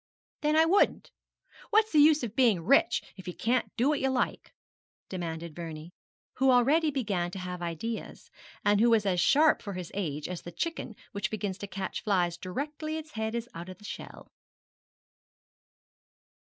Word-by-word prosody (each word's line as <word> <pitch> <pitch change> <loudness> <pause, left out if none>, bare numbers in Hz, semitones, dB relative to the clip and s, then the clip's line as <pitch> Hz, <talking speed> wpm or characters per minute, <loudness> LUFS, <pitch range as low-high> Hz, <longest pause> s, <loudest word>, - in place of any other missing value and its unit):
'Then 300 +1 +2
I 320 +1 +6
wouldn't. 380 +5 +2 0.6
What's 435 +1 +3
the 305 - +4
use 300 -1 +6
of 225 -2 -4
being 220 -10 +3
rich 245 0 +4
if 190 - -11
you 180 - -5
can't 240 +2 0
do 245 +3 +3
what 300 - +1
you 265 - +1
like?' 260 -1 -1 0.6
demanded 170 -3 -5
Vernie, 165 0 -7 0.4
who 265 +1 +4
already 280 +6 +4
began 205 -11 -1
to 180 - -8
have 180 -1 -5
ideas, 175 +7 -5 0.3
and 205 0 +4
who 235 - +5
was 225 -3 +3
as 185 -2 +1
sharp 300 - +4
for 200 - -6
his 180 -2 -6
age 155 -7 -3
as 180 -1 -5
the 175 - -8
chicken 245 - -4 0.2
which 205 +1 -2
begins 205 -3 -3
to 200 - -5
catch 190 0 -4
flies 180 -5 +1
directly 295 - -4
its 310 -1 -8
head 220 -1 -3
is 235 0 -3
out 170 +2 -7
of 185 - -9
the 210 - -15
shell. - - -9
210 Hz, 175 wpm, -29 LUFS, 180-270 Hz, 0.6 s, I